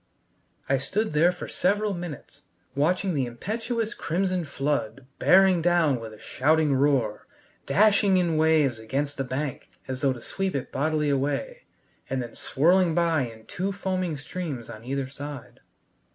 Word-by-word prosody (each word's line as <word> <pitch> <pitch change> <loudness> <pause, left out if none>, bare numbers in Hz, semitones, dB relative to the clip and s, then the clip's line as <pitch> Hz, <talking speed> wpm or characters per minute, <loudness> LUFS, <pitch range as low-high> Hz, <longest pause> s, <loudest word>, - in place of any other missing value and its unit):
I 135 0 +2
stood 205 - -1
there 165 +4 +5
for 180 - -7
several 205 +2 +1
minutes, 165 -5 -8 0.3
watching 180 +7 +1
the 135 -4 0
impetuous 220 - -3
crimson 180 +1 -1
flood 135 -4 -2
bearing 190 -2 +5
down 165 -6 +3
with 115 -1 -8
a 110 - -12
shouting 155 +5 +2
roar, 130 -6 +1 0.4
dashing 200 -2 +4
in 175 -3 +1
waves 155 -6 +3
against 140 +6 -3
the 135 - -1
bank 130 +1 -4 0.2
as 130 -1 -4
though 135 -2 +2
to 125 - -9
sweep 195 +5 -2
it 135 - -3
bodily 150 +1 0
away, 145 - -2 0.4
and 135 - -1
then 120 -2 -5
swirling 170 +3 +2
by 165 -6 +2
in 110 -1 -13
two 190 +2 -3
foaming 185 -4 -2
streams 140 -4 -6
on 110 - -10
either 135 +1 -2
side. 140 -1 -9
150 Hz, 150 wpm, -26 LUFS, 135-185 Hz, 0.4 s, there